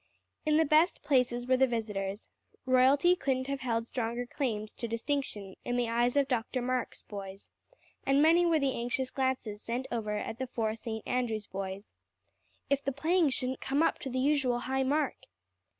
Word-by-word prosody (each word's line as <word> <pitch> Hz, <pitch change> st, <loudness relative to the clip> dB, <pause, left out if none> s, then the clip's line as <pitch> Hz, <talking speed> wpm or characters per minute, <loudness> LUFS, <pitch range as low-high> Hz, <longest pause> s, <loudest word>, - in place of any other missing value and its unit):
In 305 Hz, 0 st, +4 dB
the 320 Hz, -, +4 dB
best 310 Hz, +4 st, +3 dB
places 245 Hz, -3 st, +2 dB
were 255 Hz, 0 st, +3 dB
the 265 Hz, +1 st, +5 dB
visitors. 210 Hz, -4 st, -3 dB, 0.4 s
Royalty 265 Hz, +7 st, +5 dB
couldn't 265 Hz, -5 st, -1 dB
have 275 Hz, 0 st, -3 dB
held 230 Hz, -3 st, -1 dB
stronger 240 Hz, 0 st, -3 dB
claims 220 Hz, -5 st, -3 dB
to 235 Hz, -, -5 dB
distinction 230 Hz, -5 st, -3 dB
in 245 Hz, 0 st, -1 dB
the 240 Hz, -2 st, +1 dB
eyes 240 Hz, +2 st, +2 dB
of 280 Hz, -1 st, +3 dB
Dr. 250 Hz, 0 st, -1 dB
Marks' 255 Hz, 0 st, -2 dB
boys; 195 Hz, -1 st, -8 dB, 0.5 s
and 275 Hz, +1 st, +3 dB
many 330 Hz, +4 st, +6 dB
were 335 Hz, -2 st, +4 dB
the 275 Hz, -3 st, +1 dB
anxious 245 Hz, +2 st, -2 dB
glances 260 Hz, -6 st, -1 dB
sent 245 Hz, +3 st, -3 dB
over 215 Hz, -3 st, -1 dB
at 220 Hz, +3 st, -5 dB
the 260 Hz, -, -2 dB
four 225 Hz, -3 st, -1 dB
St. 220 Hz, -1 st, -6 dB
Andrew's 225 Hz, -4 st, -1 dB
boys. 195 Hz, +1 st, -6 dB, 0.7 s
If 280 Hz, 0 st, +1 dB
the 275 Hz, -, 0 dB
playing 315 Hz, +4 st, +2 dB
shouldn't 255 Hz, 0 st, -2 dB
come 280 Hz, +4 st, +1 dB
up -, -, +1 dB
to 270 Hz, -, -5 dB
the 255 Hz, -, -3 dB
usual 260 Hz, -3 st, +2 dB
high 265 Hz, +2 st, -1 dB
mark! 285 Hz, +2 st, +1 dB
255 Hz, 180 wpm, -31 LUFS, 230-275 Hz, 0.7 s, many